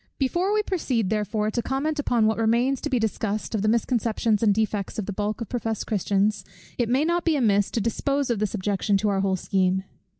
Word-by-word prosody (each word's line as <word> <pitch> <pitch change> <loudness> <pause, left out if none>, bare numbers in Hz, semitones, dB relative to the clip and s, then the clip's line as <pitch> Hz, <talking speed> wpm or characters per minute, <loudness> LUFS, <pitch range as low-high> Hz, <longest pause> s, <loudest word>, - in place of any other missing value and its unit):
Before 345 +9 0
we 425 0 +2
proceed, 255 - -1
therefore, 215 0 0
to 235 - -1
comment 290 +5 -2
upon 240 -6 +2
what 220 +1 +1
remains 240 +4 +2
to 295 - -2
be 260 - +1
discussed, 215 -1 -2
of 215 - 0
the 215 - 0
misconceptions 225 -1 +1
and 220 -2 +4
defects 210 -1 -1
of 215 - -2
the 205 - -4
bulk 210 +3 -3
of 230 - -5
professed 225 -3 -2
Christians, 205 0 0 0.4
it 235 -2 +1
may 265 +5 +2
not 340 +1 +1
be 330 -2 +2
amiss 205 -7 +2
to 230 - -2
dispose 275 +4 0
of 230 - -1
this 215 0 -1
objection 200 0 0
to 210 +2 0
our 195 -1 +1
whole 195 -1 +1
scheme. 190 0 0
220 Hz, 220 wpm, -25 LUFS, 205-255 Hz, 0.4 s, and